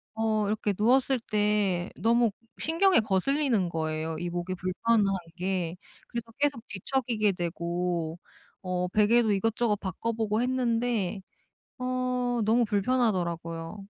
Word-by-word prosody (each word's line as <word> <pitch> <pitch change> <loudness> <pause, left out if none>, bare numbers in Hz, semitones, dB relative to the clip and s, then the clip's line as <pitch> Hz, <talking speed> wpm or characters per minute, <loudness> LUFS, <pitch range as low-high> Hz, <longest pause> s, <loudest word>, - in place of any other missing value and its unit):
어 220 -2 +1
이렇게 210 -1 0
누웠을 255 +4 +3
때 205 -4 +1
너무 235 -1 +3 0.3
신경에 340 - +4
거슬리는 220 - +1
거예요 160 0 -2
이 175 - -3
목에 175 +1 -3
불편한 205 +5 +1 0.3
게. 180 -2 -2 0.3
그래서 235 -1 -6
계속 280 -5 0
뒤척이게 215 0 0
되고 170 -1 -2 0.4
어 180 -1 -1
베개도 215 +3 +4
이것저것 225 +2 +1
바꿔 195 +4 -3
보고 220 0 0
했는데 235 -6 0 0.6
어 250 -1 -1
너무 235 +3 +3
불편하더라고요. 190 -5 -1
210 Hz, 270 characters per minute, -28 LUFS, 180-240 Hz, 0.6 s, 신경에